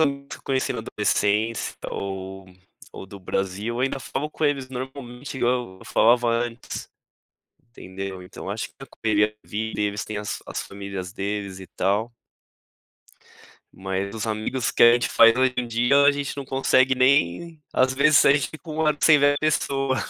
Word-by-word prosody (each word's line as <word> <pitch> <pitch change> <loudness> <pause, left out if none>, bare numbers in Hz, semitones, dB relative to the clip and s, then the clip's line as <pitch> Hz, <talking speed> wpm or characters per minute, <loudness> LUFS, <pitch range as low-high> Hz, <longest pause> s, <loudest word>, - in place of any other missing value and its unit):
amigos 140 -2 0
que - - -7
eu - - -24
conheci 130 -1 0
na - - -4
adolescência 110 +3 0 0.2
ou 95 0 -5 0.5
ou - - -9
do 100 +1 -11
Brasil, 95 +4 -3
eu - - -2
ainda 135 +1 0
falo 135 +3 -4
com 155 - -3
eles 140 -3 0
normalmente 130 +1 -7
igual 120 -6 -1
eu - - -13
falava 120 +1 +3
antes, 115 0 -3 0.8
entendeu. 95 -3 -7
Então 90 - -9
acho - - -4
que - - -30
tem - - -10
a - - -28
correria 105 -1 +1
da 105 0 -21
vida, 110 0 -3 0.3
têm 105 - -5
as 105 0 -4
as - - -4
famílias 100 -2 -7
deles 100 -1 -4
e 95 - -10
tal. 105 +5 -1 1.7
Mas 95 +1 -3
os 110 - -3
amigos 110 +3 -1
que - - +2
a 120 - +8
gente 120 0 +1
faz 115 0 +6
hoje 130 0 +3
dia 120 +5 +3
a 145 - +6
gente 140 0 -4
não 140 - -5
consegue 130 0 +3
nem 135 - +2
às 130 0 +3
vezes 140 +2 +5
a - - +7
gente 145 -2 0
fica 160 +1 -11
um 155 +1 -1
ano 150 - +2
sem 155 -2 +7
ver 145 0 +4
a - - -2
pessoa. 135 -3 0
120 Hz, 180 wpm, -24 LUFS, 100-135 Hz, 1.7 s, a